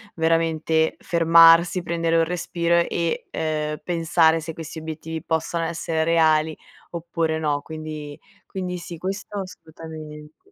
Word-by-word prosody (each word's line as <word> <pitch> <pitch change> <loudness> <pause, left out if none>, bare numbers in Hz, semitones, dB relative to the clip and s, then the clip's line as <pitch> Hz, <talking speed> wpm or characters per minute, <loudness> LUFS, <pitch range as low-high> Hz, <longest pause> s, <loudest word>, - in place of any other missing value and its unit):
veramente 160 -1 +1
fermarsi, 165 +1 +5
prendere 165 -1 0
un 165 - +4
respiro 170 0 -1
e, 170 -1 -2
uhm, 150 -1 -2
pensare 165 -1 +2
se 160 +1 -6
questi 160 0 -7
obiettivi 160 0 -6
possano 165 0 -1
essere 165 -1 -2
reali, 160 -1 +3 0.3
oppure 165 -1 -2
no. 150 -2 -1
Quindi 155 -1 -8 0.3
quindi 180 -2 -4
sì, 170 0 -8
questo 195 +4 -5
assolutamente. 160 - -11
165 Hz, 120 wpm, -23 LUFS, 160-170 Hz, 0.3 s, fermarsi